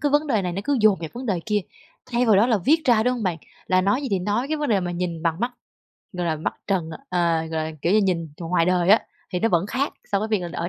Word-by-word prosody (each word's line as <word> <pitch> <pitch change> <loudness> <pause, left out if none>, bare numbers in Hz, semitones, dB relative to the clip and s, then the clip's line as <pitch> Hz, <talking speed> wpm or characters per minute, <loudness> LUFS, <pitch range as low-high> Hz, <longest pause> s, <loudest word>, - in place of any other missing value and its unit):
cái 290 -2 +1
vấn 295 +1 +2
đề 225 -8 +1
này 180 -1 -2
nó 195 - -3
cứ 285 -3 +1
dồn 210 -4 +5
vào 165 - -4
vấn 250 +2 -7
đề 190 -6 0
kia, 210 -1 +1 0.5
thay 245 0 0
vào 215 -3 +5
đó 215 +4 +5
là 225 -4 +2
viết 310 - +2
ra, 235 -5 +4
đúng 250 +1 +1
hông 235 - -4
bạn? 175 -4 -1 0.3
Là 185 0 +3
nói 205 +9 +1
gì 270 - -3
thì 195 - +2
nói 210 +8 -1
cái 310 - 0
vấn 295 -1 -2
đề 205 -4 +3
mà 175 - -3
nhìn 175 -2 -3
bằng 165 +1 0
mắt, 245 +1 -1 0.6
gọi 180 -2 -3
là, 160 -2 0
mắt 155 - -3
trần 180 -5 -1 0.2
ờ, 170 -2 +1
gọi - - -9 0.2
là, 160 - -4
kiểu 170 - +2
như, 215 - +5
nhìn 170 -5 0
ngoài 170 0 +1
đời 180 0 +2
á, 215 - +7 0.3
thì 180 - -1
nó 225 - +3
vẫn 175 -1 +1
khác 265 +6 -1 0.2
so 200 - +3
với 215 +2 -2
việc 215 -3 +1
là 175 - -4
ở 170 - -2
195 Hz, 305 wpm, -23 LUFS, 175-240 Hz, 0.6 s, á